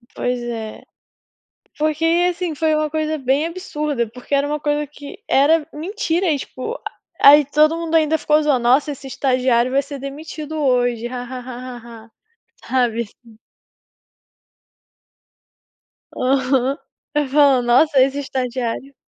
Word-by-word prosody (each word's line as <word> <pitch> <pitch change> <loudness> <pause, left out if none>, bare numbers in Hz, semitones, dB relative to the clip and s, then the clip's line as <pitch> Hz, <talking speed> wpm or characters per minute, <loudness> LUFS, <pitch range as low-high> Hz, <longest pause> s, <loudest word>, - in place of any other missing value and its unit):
Pois 245 0 -2
é. 225 -2 -6 0.9
Porque, 310 +1 0 0.2
assim, 350 -2 -3
foi 315 +1 +1
uma 305 0 0
coisa 310 0 -2
bem 275 +3 +1
absurda. 300 -8 -3
Porque 250 +4 -9
era 280 +1 +2
uma 300 +1 -2
coisa 295 0 -1
que 295 +6 -11
era 300 +3 +3
mentira 350 +2 -2
e, 290 - 0
tipo, 265 - -6 0.4
a - - +9
aí 295 0 +7
todo 305 +3 +3
mundo 330 -1 -2
ainda 320 0 +3
ficou 305 0 +2
zoando: 295 -4 +2
"Nossa, 255 +5 +2
esse 275 -1 -9
estagiário 255 -2 +1
vai 275 +1 +2
ser 280 0 -8
demitido 300 +3 -7
hoje, 245 -4 +1
ha-ha-ha-ha-ha", 245 -2 -8 0.6
sabe, 240 -3 +1
assim. 225 0 -16 2.8
Aham. 265 +1 +1 0.4
Vai 295 -1 +1
falando: 275 -3 +4
"Nossa, 270 +3 +4
esse 270 +2 +2
estagiário" 255 -1 -3
275 Hz, 130 wpm, -20 LUFS, 250-305 Hz, 2.8 s, a